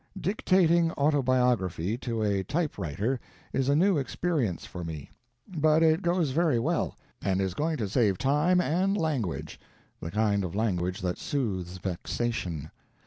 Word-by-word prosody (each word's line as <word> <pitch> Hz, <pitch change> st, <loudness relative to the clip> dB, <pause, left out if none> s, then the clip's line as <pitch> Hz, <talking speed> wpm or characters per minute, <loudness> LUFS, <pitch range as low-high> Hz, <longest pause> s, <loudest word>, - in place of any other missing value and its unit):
Dictating 175 Hz, -4 st, +3 dB
autobiography 125 Hz, -, +1 dB
to 115 Hz, -4 st, -2 dB
a 100 Hz, -2 st, +1 dB
typewriter 125 Hz, -, -2 dB, 0.3 s
is 135 Hz, 0 st, +1 dB
a 140 Hz, -, +4 dB
new 180 Hz, +1 st, +4 dB
experience 135 Hz, -, -1 dB
for 90 Hz, -, -7 dB
me, 80 Hz, -4 st, -7 dB, 0.4 s
but 155 Hz, -2 st, +3 dB
it 160 Hz, +2 st, +4 dB
goes 170 Hz, -5 st, +1 dB
very 155 Hz, -2 st, +2 dB
well, 155 Hz, +9 st, -1 dB, 0.2 s
and 95 Hz, -1 st, 0 dB
is 95 Hz, -2 st, 0 dB
going 155 Hz, -, -1 dB
to 110 Hz, -, -2 dB
save 100 Hz, -2 st, +2 dB
time 150 Hz, +7 st, +3 dB
and 185 Hz, +4 st, +1 dB
"language" 140 Hz, -, -2 dB, 0.4 s
the 80 Hz, -, -5 dB
kind 105 Hz, 0 st, +1 dB
of 90 Hz, -1 st, -4 dB
language 90 Hz, -4 st, -1 dB
that 90 Hz, -1 st, -2 dB
soothes 95 Hz, -10 st, -2 dB
vexation. 90 Hz, -3 st, -3 dB
125 Hz, 140 wpm, -28 LUFS, 95-160 Hz, 0.4 s, a